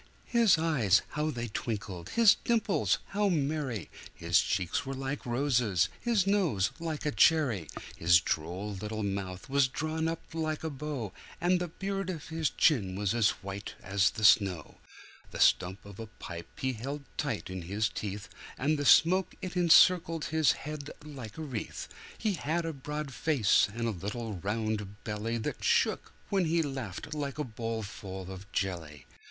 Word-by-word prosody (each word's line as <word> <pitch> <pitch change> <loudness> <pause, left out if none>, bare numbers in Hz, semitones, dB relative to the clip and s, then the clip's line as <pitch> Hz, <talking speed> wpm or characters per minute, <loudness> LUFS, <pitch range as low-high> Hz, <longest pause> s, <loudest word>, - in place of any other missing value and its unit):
His 230 -7 +4
eyes 130 - +3
how 150 +1 -1
they 120 -4 -4
twinkled! 100 -5 -4
his 230 -3 +6
dimples 225 -4 +1
how 205 +1 +1
merry! 145 - -1 0.3
His 85 0 +3
cheeks 95 -2 0
were 135 0 -5
like 135 0 -4
roses, 120 - +2
his 230 -6 +2
nose 180 - +2
like 160 -3 -4
a 150 - +1
cherry! 135 - +3 0.3
His 85 0 +6
droll 90 +8 -3
little 105 +2 -4
mouth 95 -2 -4
was 140 0 +3
drawn 155 +4 -2
up 165 0 -3
like 155 -1 -2
a 160 - -2
bow, 135 -7 -4 0.3
And 180 +1 +3
the 175 - -2
beard 195 +3 -3
of 165 -5 -5
his 160 -2 0
chin 100 - +2
was 100 +1 0
as 115 -4 +4
white 100 +1 -6
as 100 +2 +3
the 110 - -6
snow; 95 -6 +4 0.5
The - - -8
stump 95 +3 +3
of 100 0 -11
a 115 - -6
pipe 85 -5 -8
he 130 0 0
held 140 +6 -5
tight - - -2
in 95 -1 -4
his 100 +6 0
teeth, 100 0 -5 0.3
And 150 +3 +1
the 145 - -1
smoke 185 +6 +5
it 185 0 -6
encircled 170 -2 +5
his 160 -4 +4
head 150 0 -6 0.2
like 130 -8 -8
a 160 - -4
wreath; 125 -8 -5 0.3
He 215 -3 0
had 165 +1 -1
a 165 - -2
broad 150 0 -5
face 125 -9 +3
and 115 +2 -2
a - - +1
little 105 +4 -4
round 105 +1 -3
belly, 110 +2 -2
That 110 - -4
shook, - - +2 0.2
when 195 -3 +2
he 165 +1 +2
laughed 135 -1 -5
like 145 -2 -3
a 150 - -1
bowlful 110 -6 -5
of 95 +2 -10
jelly. 85 -8 -3
125 Hz, 170 wpm, -30 LUFS, 100-155 Hz, 0.5 s, his